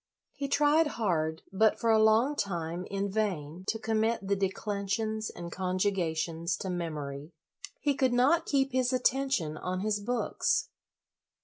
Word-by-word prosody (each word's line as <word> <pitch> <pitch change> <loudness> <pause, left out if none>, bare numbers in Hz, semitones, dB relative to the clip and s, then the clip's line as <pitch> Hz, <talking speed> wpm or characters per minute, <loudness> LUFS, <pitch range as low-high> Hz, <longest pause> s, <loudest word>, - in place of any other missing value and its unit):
He 280 - -4
tried 295 +3 +4
hard, 160 -7 0
but, 215 +3 +3
for 230 - +2
a 220 -1 +5
long 225 +7 +4
time, 175 - -3
in 200 0 -2
vain, 185 -5 -2
to 225 - 0
com 220 0 -1
mit 220 -2 0
the 200 - +2
declensions 205 +2 -2
and 170 -1 -8
conjugations 180 -3 -1
to 190 - -4
memory. 150 -3 -5 0.5
He 290 -2 +1
could 260 -2 +2
not 265 +8 +3
keep 275 -1 +2
his 255 0 +1
atten 265 +2 +1
tion 155 - -1
on 185 +2 -3
his 210 0 0
books. 235 +4 0
200 Hz, 150 wpm, -30 LUFS, 175-240 Hz, 0.5 s, a